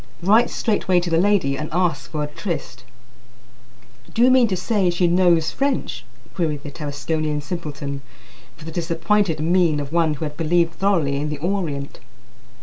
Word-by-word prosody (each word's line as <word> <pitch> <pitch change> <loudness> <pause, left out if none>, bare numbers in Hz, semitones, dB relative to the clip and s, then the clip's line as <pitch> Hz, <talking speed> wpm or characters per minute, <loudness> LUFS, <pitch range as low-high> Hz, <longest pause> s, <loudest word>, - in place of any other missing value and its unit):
"Write 220 +6 +5
straightway 190 -5 +1
to 175 -1 -3
the 165 - +3
lady 185 -8 +2
and 150 +2 -5
ask 170 -3 0
for 150 -2 -2
a - - -2
tryst." 150 - -5 1.3
"Do 235 - +2
you 255 - +6
mean 255 -2 +5
to 190 -3 -1
say 195 0 +1
she 175 +1 +1
knows 170 -2 +3
French?" 275 -1 -2 0.3
queried 155 -5 -2
the 145 - -7
Tarasconian 150 +1 -2
simpleton, 145 -4 -5 0.6
with - - -12
the 165 - -6
disappointed 165 +1 0
mien 165 -1 +2
of 145 +1 -6
one 165 -3 +2
who 150 - -4
had 150 -1 -6
believed 165 +1 +2
thoroughly 165 -8 +1
in 150 +2 -2
the 150 - -3
Orient. 155 -4 -3
165 Hz, 165 wpm, -22 LUFS, 150-185 Hz, 1.3 s, you